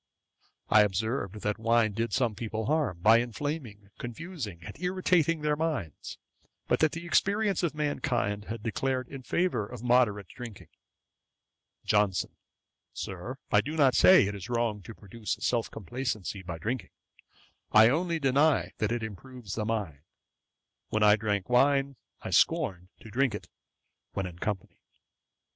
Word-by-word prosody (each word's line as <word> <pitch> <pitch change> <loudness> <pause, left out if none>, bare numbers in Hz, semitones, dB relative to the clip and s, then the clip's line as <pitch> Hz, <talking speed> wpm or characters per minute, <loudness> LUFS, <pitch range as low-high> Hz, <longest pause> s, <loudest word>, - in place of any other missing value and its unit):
I 110 - +6
observed, 105 +1 -1
that 105 +1 -1
wine 115 -1 +3
did 115 +3 -2
some 120 -4 +1
people 110 +1 -4
harm, 140 - 0
by 110 +4 +6
inflaming, 120 -4 -5
confusing, 120 - -6
and - - -8
irritating 180 -3 +2
their 150 0 +1
minds; 150 - -3 0.5
but - - +2
that 155 -1 +3
the 165 +1 -6
experience 200 +2 +2
of 170 -4 -1
mankind 125 -9 -1
had 115 -1 -6
declared 130 +2 -1
in 135 - -8
favour 170 -1 0
of 120 -1 -9
moderate 120 -6 +3
drinking. 120 -5 -10 1.2
JOHNSON. 105 -3 +2 0.6
'Sir, 95 +8 -6
I - - +5
do 150 +3 -5
not 135 -4 +5
say 185 - +7
it 100 - -2
is 100 +1 -8
wrong 115 -3 0
to 115 +3 -10
produce 105 +2 -5
self 120 -2 0
complacency 110 -2 -4
by 90 -3 -6
drinking; 115 +9 -3 0.8
I 110 +1 +8
only 165 +4 0
deny 140 +1 +2
that 110 0 0
it 120 -1 -1
improves 110 0 -8
the 110 - -2
mind. 100 -11 -3 0.9
When 110 0 +1
I 105 0 +7
drank 105 -3 -1
wine, 135 +2 +3 0.3
I - - -5
scorned 90 -1 +2
to 115 - -11
drink 125 -2 +1
it - - -9 0.6
when 95 - -2
in 90 -1 -8
company. 100 -3 -4
115 Hz, 150 wpm, -29 LUFS, 105-140 Hz, 1.2 s, I